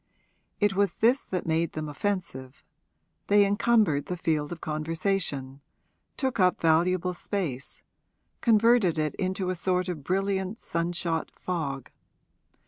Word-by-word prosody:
It 205 Hz, -1 st, +3 dB
was 200 Hz, 0 st, +1 dB
this 245 Hz, +5 st, +2 dB
that 185 Hz, -2 st, -3 dB
made 165 Hz, 0 st, 0 dB
them 155 Hz, -1 st, -4 dB
offensive; 145 Hz, -6 st, -4 dB, 0.6 s
they 205 Hz, 0 st, +5 dB
encumbered 205 Hz, -7 st, +2 dB
the 180 Hz, -, -3 dB
field 155 Hz, -3 st, -1 dB
of 170 Hz, -, -6 dB
conversation, 155 Hz, -3 st, -2 dB, 0.6 s
took 260 Hz, -5 st, -1 dB
up 180 Hz, -1 st, +3 dB
valuable 175 Hz, +3 st, +2 dB
space, 170 Hz, -9 st, -4 dB, 0.6 s
converted 225 Hz, -6 st, +4 dB
it 155 Hz, -1 st, 0 dB
into 185 Hz, -1 st, -2 dB
a -, -, -2 dB
sort 180 Hz, +1 st, 0 dB
of 160 Hz, -6 st, -5 dB
brilliant 195 Hz, +3 st, -1 dB
sun 170 Hz, +1 st, -2 dB
shot 165 Hz, -2 st, -1 dB
fog. 140 Hz, -8 st, -4 dB
180 Hz, 130 wpm, -27 LUFS, 155-200 Hz, 0.6 s, they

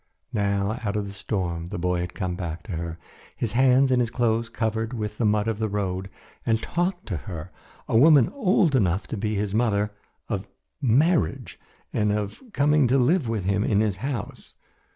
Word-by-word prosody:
Now, 100 Hz, +1 st, 0 dB
out 100 Hz, -2 st, -1 dB
of 105 Hz, -1 st, -1 dB
the 100 Hz, -, -7 dB
storm, 90 Hz, -4 st, -3 dB
the 100 Hz, -, -5 dB
boy 90 Hz, 0 st, 0 dB
had 90 Hz, 0 st, -4 dB
come 95 Hz, -4 st, -2 dB
back 85 Hz, -2 st, -5 dB
to 110 Hz, -, -9 dB
her, 85 Hz, -1 st, -4 dB, 0.4 s
his 115 Hz, -, -2 dB
hands 130 Hz, +2 st, +4 dB
and 125 Hz, -1 st, +4 dB
his 120 Hz, -, 0 dB
clothes 115 Hz, -1 st, 0 dB
covered 110 Hz, +1 st, -2 dB
with 105 Hz, -2 st, -4 dB
the 115 Hz, -, +3 dB
mud 105 Hz, +1 st, +2 dB
of 110 Hz, -2 st, -1 dB
the 110 Hz, -1 st, 0 dB
road, 95 Hz, -2 st, -2 dB, 0.3 s
and 110 Hz, -1 st, +2 dB
talked 175 Hz, -, -2 dB
to 95 Hz, -, -1 dB
her, 85 Hz, -1 st, -7 dB, 0.4 s
a -, -, -1 dB
woman 140 Hz, +1 st, +7 dB
old 190 Hz, -, +2 dB
enough 95 Hz, -5 st, +2 dB
to -, -, -3 dB
be 105 Hz, +1 st, -1 dB
his 100 Hz, -1 st, -1 dB
mother, 105 Hz, -2 st, +1 dB, 0.4 s
of 100 Hz, -2 st, -3 dB, 0.3 s
marriage 140 Hz, -, +2 dB, 0.3 s
and 105 Hz, -1 st, +2 dB
of 105 Hz, -1 st, -3 dB
coming 150 Hz, -4 st, +3 dB
to 130 Hz, +3 st, +3 dB
live 135 Hz, +1 st, +2 dB
with 110 Hz, -4 st, -1 dB
him 100 Hz, +2 st, +1 dB
in 105 Hz, -2 st, +2 dB
his 105 Hz, -3 st, +1 dB
house. 125 Hz, -1 st, -5 dB
105 Hz, 195 wpm, -25 LUFS, 100-120 Hz, 0.4 s, woman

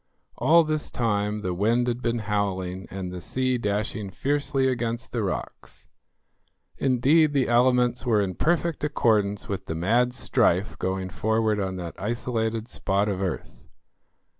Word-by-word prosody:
All 165 Hz, +1 st, +5 dB
this 155 Hz, -1 st, -2 dB
time 105 Hz, -2 st, -1 dB
the 90 Hz, -3 st, -2 dB
wind 115 Hz, +7 st, +2 dB
had 120 Hz, 0 st, -1 dB
been 120 Hz, -1 st, 0 dB
howling 95 Hz, -3 st, -2 dB
and 95 Hz, -1 st, -5 dB
the 90 Hz, -1 st, -7 dB
sea 130 Hz, +5 st, -1 dB
dashing 105 Hz, -1 st, -2 dB
fiercely 140 Hz, +5 st, 0 dB
against 120 Hz, -1 st, -2 dB
the 120 Hz, -, -1 dB
rocks; 95 Hz, -4 st, -5 dB, 0.9 s
indeed, 140 Hz, +4 st, +3 dB
the 135 Hz, -3 st, +2 dB
elements 125 Hz, 0 st, +3 dB
were 115 Hz, -4 st, +2 dB
in 95 Hz, -2 st, -1 dB
perfect 170 Hz, -, 0 dB
accordance 105 Hz, -8 st, +1 dB
with 100 Hz, -1 st, -4 dB
the 80 Hz, -, -3 dB
mad 120 Hz, +9 st, +2 dB
strife 105 Hz, -4 st, +1 dB
going 95 Hz, 0 st, -2 dB
forward 110 Hz, +2 st, 0 dB
on 95 Hz, -1 st, -2 dB
that 85 Hz, -2 st, -6 dB
isolated 115 Hz, 0 st, -2 dB
spot 100 Hz, -3 st, 0 dB
of 95 Hz, -2 st, -2 dB
earth. 95 Hz, -4 st, -5 dB
110 Hz, 145 wpm, -25 LUFS, 100-125 Hz, 0.9 s, All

